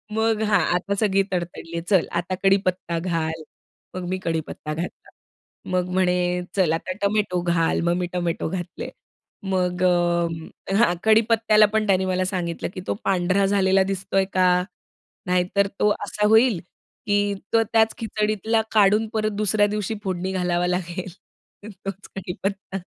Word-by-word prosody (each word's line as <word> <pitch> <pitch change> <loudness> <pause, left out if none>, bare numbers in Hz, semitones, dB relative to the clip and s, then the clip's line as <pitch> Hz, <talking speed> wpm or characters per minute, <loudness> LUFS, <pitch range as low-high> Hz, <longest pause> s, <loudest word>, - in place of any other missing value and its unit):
मग, 220 0 +1
"हां, 210 -1 +3 0.2
आता 200 +3 -1
सगळी 195 -2 +3
तडतडली, 170 -1 -4
चल 190 -5 +3
आता 185 +2 -4
कढीपत्ता 185 -3 +1
घाल." 165 -2 -2 0.5
मग 185 - -4
मी 185 - -1
कढीपत्ता 160 -2 -3
घातला, 170 +3 -6 0.6
मग 180 0 0
म्हणे, 185 -1 +2 0.4
"चल 175 -5 +3
आता 165 +3 -3
टोमॅटो 200 -3 +1
घाल." 170 -2 +1
मग 170 0 +2
मी 180 - -1
टोमॅटो 175 -2 -1
घातले. 180 0 -5 0.6
मग 180 -1 0
अ, 170 0 0
हां, 200 -5 +4
कढीपत्त्याला 220 -1 +5
पण 215 -1 +1
त्यांनी 190 -1 +3
मला 185 0 0
सांगितलं, 175 -3 -3
की 185 - -6
"तो - - +1
पांढरा 190 +1 +2
झालेला 195 -1 +3
दिसतोय 195 0 0
का? 185 -1 +3 0.8
नाहीतर 180 +2 +1
तो 210 - +4 0.2
असा 210 +1 0
होईल 220 -2 +5 0.5
की, 205 0 +2 0.2
तो 225 0 +5
त्याच 220 0 +4
खिचडीतला 215 0 0
काढून 210 +1 +4
परत 215 -1 0
दुसऱ्या 205 0 +3
दिवशी 210 +1 -2
फोडणी 185 -1 -2
घालावा 180 -1 0
लागेल 180 +1 -3 0.6
तोच 195 0 -8
कढीपत्ता." 195 +1 -4
190 Hz, 140 wpm, -23 LUFS, 175-205 Hz, 0.8 s, कढीपत्त्याला